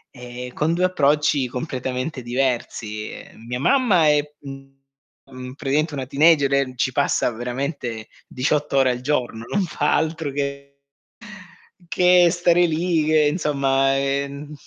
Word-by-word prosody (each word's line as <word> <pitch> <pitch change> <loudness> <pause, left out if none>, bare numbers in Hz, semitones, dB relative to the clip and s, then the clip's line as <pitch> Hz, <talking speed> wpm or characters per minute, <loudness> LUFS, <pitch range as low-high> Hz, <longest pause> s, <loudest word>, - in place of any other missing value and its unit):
e 125 0 -8
con 160 +2 0
2 180 - -1
approcci 145 -5 +2
completamente 130 +1 -4
diversi, 120 -4 -3
ehm, 115 - -13
mia 125 +1 -3
mamma 200 - +3
è 150 0 +4 0.2
mhmm 135 -2 -13
praticamente 150 +2 -1
una 135 -2 -4
teenager 140 0 +3
e 135 -2 +1
ci 130 +1 0
passa 125 - +1
veramente 120 -1 -5 0.2
18 145 +2 -1
ore 130 -1 +4
al 125 0 -5
giorno, 125 -5 -2
non 200 - +1
fa 150 -4 0
altro 160 -1 -1
che 140 0 -5 1.1
che 180 0 +4
stare 175 0 +3
lì, 165 0 0
che 155 0 +3
insomma, 135 -4 +1
ehm, 140 +2 -3
140 Hz, 130 wpm, -22 LUFS, 130-155 Hz, 1.1 s, è